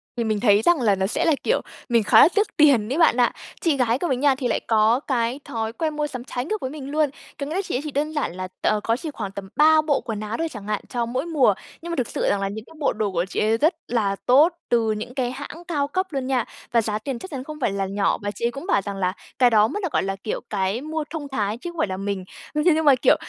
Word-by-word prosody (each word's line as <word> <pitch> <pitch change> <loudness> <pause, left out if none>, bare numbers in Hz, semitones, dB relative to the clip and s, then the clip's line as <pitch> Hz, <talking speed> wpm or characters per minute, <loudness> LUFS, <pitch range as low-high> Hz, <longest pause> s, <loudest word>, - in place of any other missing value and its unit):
Thì 235 - -1
mình 215 -2 0
thấy 205 -2 +4
rằng 330 +2 +3
là 210 -4 +3
nó 190 0 0
sẽ 215 - 0
là, 325 - +4
kiểu, - - +2 0.3
mình 235 -2 +3
khá - - +7
là - - +9
tiếc 415 0 +3
tiền 270 -8 +5
ấy - - -1
bạn 325 -7 +5
ạ. 245 -1 +4 0.3
Chị 320 -5 +2
gái 245 -1 +2
của 350 - -1
mình 260 -5 0
nha 280 -1 +4
thì 260 -2 -2
lại - - 0
có 220 +2 +4
cái 250 -2 -1
thói 225 -1 -3
quen 310 +2 -2
mua 300 0 -1
sắm 255 -4 -6
trái 245 -1 -4
ngược 430 +6 -3
với 260 - -2
mình 280 -1 -7
luôn, 305 -1 +2 0.3
có 280 - -2
nghĩa 305 +4 -4
là 385 - +1
chị 380 - -4
ấy 255 - 0
chỉ 305 - -5
đơn 295 +3 -1
giản 295 - -2
là 185 0 -4
t - - 0 0.2
có 230 - +1
chỉ 310 +3 -5
khoảng 205 -8 -5
tầm 195 -1 -8
3 310 +1 +6
bộ 300 -2 +1
quần 220 -3 -3
áo 215 +1 -4
thôi 330 - -1
chẳng 210 -5 -9
hạn, 210 -1 -1
cho 240 -2 -1
mỗi 255 +5 -2
mùa, 295 -10 +3 0.3
nhưng 340 - -6
mà - - -1
thực 255 -6 -1
sự - - -4
rằng 200 - +1
là 195 - 0
những 215 +2 -7
cái - - -16
bộ 295 - +1
đồ 210 -2 -1
của 175 -1 0
chị - - -3
ấy 220 +1 +2
rất 315 +9 +3
là 210 -5 0
tốt 290 +8 +5 0.2
từ 230 -2 +2
những 215 +3 -4
cái 250 -2 -1
hãng 290 +5 -8
cao 290 -5 0
cấp 375 +5 -1
luôn 270 -5 -3
nha, 255 -4 +1 0.3
và 230 -1 +4
giá 210 -1 -2
tiền 245 +2 -4
chắc 375 - -9
chắn 260 -2 -4
không 305 +1 -8
phải 230 - +1
là 195 0 -1
nhỏ. 200 +1 0
Và 205 0 -2
chị 220 +4 -4
ấy 235 - +1
cũng 275 +8 -8
bảo 200 - +3
rằng 200 0 -5
là 185 -1 0 0.3
cái 250 -2 +6
đó 215 -2 +5
mới 415 - -4
được 360 - -1
gọi - - +1
là, 195 0 -2
kiểu, 195 +2 -4
cái 200 +3 -1
mua 315 +1 -3
thông 300 -2 -5
thái 215 -5 -1
chứ 345 +8 -6
không 340 - -15
phải 215 - +1
là 185 - -4
mình. 195 -1 -3 0.3
Ưm, 300 0 0
thế 350 - +5
nhưng 320 0 0
mà, 285 -2 +7
kiểu, 245 - +4
250 Hz, 310 wpm, -23 LUFS, 215-300 Hz, 0.3 s, là